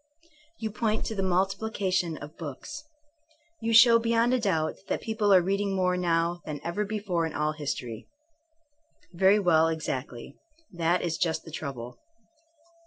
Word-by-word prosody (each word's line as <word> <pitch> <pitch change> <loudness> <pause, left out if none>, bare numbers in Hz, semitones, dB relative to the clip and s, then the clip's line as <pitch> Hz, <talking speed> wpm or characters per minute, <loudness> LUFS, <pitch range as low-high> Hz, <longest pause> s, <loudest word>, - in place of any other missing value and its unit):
You 220 -1 -4
point 215 +1 -1
to 220 - -3
the 195 - -1
multiplication 190 -2 0
of 145 +2 -10
books. 145 - -8 0.8
You 225 0 -1
show 230 +1 +8
beyond 230 +1 +2
a 255 - +2
doubt 165 -8 0
that - - -1
people 220 -2 0
are 185 -2 +6
reading 195 +1 0
more 180 -1 +1
now 170 -1 0
than 150 -2 -5
ever 175 +5 -2
before 200 -5 -1
in 160 - -8
all 150 +1 0
history.... 125 -7 -5 1.1
Very 190 +3 +5
well, 165 -5 +4
exactly. 140 -5 -4 0.4
That 175 0 0
is 165 -2 -2
just 165 -2 -1
the 160 - -10
trouble. 125 -6 -6
180 Hz, 150 wpm, -27 LUFS, 160-210 Hz, 1.1 s, show